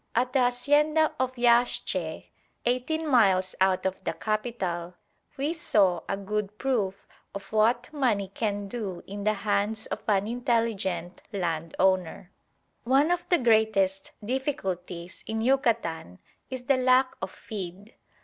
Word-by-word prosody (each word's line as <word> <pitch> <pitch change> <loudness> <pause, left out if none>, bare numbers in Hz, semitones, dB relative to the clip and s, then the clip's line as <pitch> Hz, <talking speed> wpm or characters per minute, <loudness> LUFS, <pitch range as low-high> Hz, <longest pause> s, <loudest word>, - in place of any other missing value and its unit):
At 250 +2 +1
the 270 - +3
hacienda 290 +5 +3
of 260 0 0
Yaxche, 240 0 +1 0.3
eighteen 255 +7 0
miles 195 -8 +4
out 190 -1 +3
of 190 0 -2
the - - -1
capital, 195 -6 -3 0.4
we 285 +4 0
saw 195 - +2
a 195 - 0
good 210 +1 -3
proof 205 -7 -1 0.3
of 200 - -8
what 235 +5 +2
money 225 -9 +1
can 205 -2 -2
do 195 -5 -5
in 200 +1 -6
the 215 - +3
hands 210 +2 0
of - - -4
an 200 -2 +2
intelligent 225 -6 -1
land 165 -5 -2
owner. 185 0 +1 0.5
One 275 +6 +3
of 350 0 -1
the 350 - +5
greatest 220 - +2
difficulties 185 - -3
in 220 0 -2
Yucatan 225 - 0 0.3
is 255 -1 -6
the 275 0 +3
lack 255 0 +4
of - - -3
feed. 200 +1 -8
215 Hz, 135 wpm, -27 LUFS, 190-250 Hz, 0.5 s, the